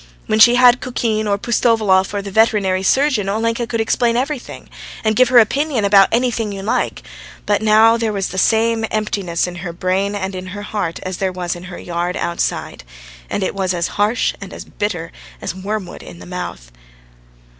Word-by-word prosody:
When 215 - 0
she 240 +2 +8
had 245 0 +5
Kukin, 225 -4 -1
or 200 -1 +1
Pustovalov, 215 -4 +2
or 205 -1 -3
the 200 - -7
veterinary 200 -3 +2
surgeon, 250 -1 +2
Olenka 230 +3 -1
could 230 -1 -2
explain 235 +1 +1
everything, 270 +1 -4 0.4
and 220 -1 +1
give 255 +2 +4
her 250 - +5
opinion 255 0 +3
about 195 -1 +6
anything 230 -3 0
you 195 -1 -6
like, 215 - -1 0.4
but 205 0 +1
now 220 +1 +5
there 225 -2 -1
was 195 -2 -2
the 190 - -3
same 225 +2 +2
emptiness 200 -5 -1
in 180 -1 -7
her 175 0 -5
brain 190 +4 -1
and 190 -1 -3
in 185 0 -6
her 205 +2 -7
heart 205 -5 -3
as 185 -1 -4
there 190 -1 -1
was 180 -1 -3
in 175 +1 -10
her 175 -1 -8
yard 175 +1 -3
outside. 170 - -3 0.5
And 200 - -2
it - - -2
was 190 -2 -1
as 170 -1 -1
harsh 210 +4 0
and 195 -1 -8
as - - -8
bitter 175 -6 -4 0.3
as - - -4
wormwood 195 0 -5
in - - -11
the - - -12
mouth. 175 - -7
205 Hz, 190 wpm, -18 LUFS, 185-230 Hz, 0.5 s, she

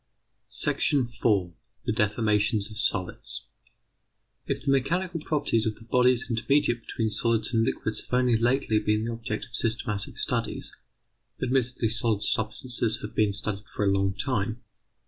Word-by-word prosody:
§ 125 -4 +1
4. 95 -6 +2 0.3
THE - - +1
DEFORMATIONS 105 0 +1
OF 105 - -5
SOLIDS 95 -4 -1 1.0
If - - -2
the 140 - +3
mechanical 170 +6 0
properties 140 -8 +1
of 110 - -2
the - - -16
bodies 125 +1 +3
intermediate 120 +1 +1
between 110 -1 -2
solids 115 +1 +2
and 115 -1 +3
liquids 110 -1 -1
have - - -14
only 125 -2 +3
lately 115 -1 +2
been 105 +1 0
the 115 - -2
object 115 -2 -4
of 120 - -22
systematic 110 -3 -2
studies, - - -1 0.7
admittedly 125 -2 0
solid 110 -2 +3
substances 110 0 0
have 105 - -6
been 105 -2 +2
studied 100 0 -4
for 105 - -2
a 100 - +3
long 95 -1 +1
time. 115 -2 -2
115 Hz, 145 wpm, -27 LUFS, 105-125 Hz, 1.0 s, the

